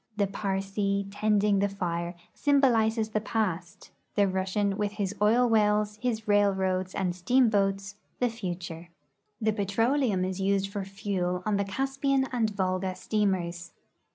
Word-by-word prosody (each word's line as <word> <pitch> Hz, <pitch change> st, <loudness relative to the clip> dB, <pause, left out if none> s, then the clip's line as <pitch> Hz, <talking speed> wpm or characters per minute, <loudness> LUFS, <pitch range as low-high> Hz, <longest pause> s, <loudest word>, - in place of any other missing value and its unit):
The 205 Hz, -, +3 dB
Parsee 195 Hz, 0 st, -1 dB
tending 205 Hz, -1 st, +2 dB
the 200 Hz, +1 st, +1 dB
fire 175 Hz, -2 st, -3 dB, 0.2 s
symbolizes 230 Hz, -6 st, +2 dB
the 215 Hz, -1 st, -1 dB
past; 185 Hz, -6 st, -3 dB, 0.2 s
the 205 Hz, -1 st, +4 dB
Russian 190 Hz, +2 st, 0 dB
Avith 205 Hz, 0 st, -2 dB
his 205 Hz, -2 st, -2 dB
oil 235 Hz, +4 st, +4 dB
Avells, 210 Hz, -1 st, +2 dB
his 225 Hz, -3 st, -2 dB
railroads, 190 Hz, -2 st, +1 dB
and 180 Hz, -2 st, -1 dB
steamboats, 200 Hz, -1 st, +1 dB, 0.2 s
the 250 Hz, -, +2 dB
future. 175 Hz, -5 st, -6 dB, 0.5 s
The 220 Hz, -1 st, +1 dB
petroleum 210 Hz, 0 st, +1 dB
is 190 Hz, +1 st, -3 dB
used 195 Hz, 0 st, +1 dB
for 200 Hz, -1 st, -3 dB
fuel 190 Hz, -2 st, -2 dB
on 210 Hz, -2 st, +1 dB
the 200 Hz, -, 0 dB
Caspian 270 Hz, +5 st, 0 dB
and 230 Hz, -3 st, +1 dB
Volga 185 Hz, -2 st, -1 dB
steamers. 180 Hz, -6 st, -1 dB
200 Hz, 135 wpm, -28 LUFS, 190-215 Hz, 0.5 s, the